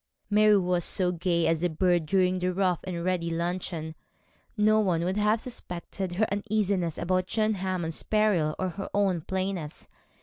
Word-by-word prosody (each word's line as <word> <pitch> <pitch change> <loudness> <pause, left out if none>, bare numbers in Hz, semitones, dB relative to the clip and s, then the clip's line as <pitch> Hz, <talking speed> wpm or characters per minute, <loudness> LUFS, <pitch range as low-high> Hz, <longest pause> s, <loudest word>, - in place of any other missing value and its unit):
Mary 210 0 +5
was 180 0 +3
as 180 -1 +2
gay 170 -1 +1
as 165 -1 +1
a 175 - +1
bird 175 0 +1
during 185 +1 +2
that 180 0 -1
rough 185 -3 +1
and 175 -2 -4
ready 180 -2 0
luncheon. 170 -1 -3 0.6
No 215 +1 +4
one 180 -5 +1
would 185 +3 -1
have 210 +2 +2
suspected 185 -5 -6
her 210 +5 +2
uneasiness 200 -5 -1
about 185 +1 0
John 215 +1 +1
Hammond's 185 -4 -3
peril 205 -8 +1
or 185 - -1
her 195 +2 -6
own 195 -4 +1
plainness. 185 -3 -4
185 Hz, 165 wpm, -27 LUFS, 170-200 Hz, 0.6 s, Mary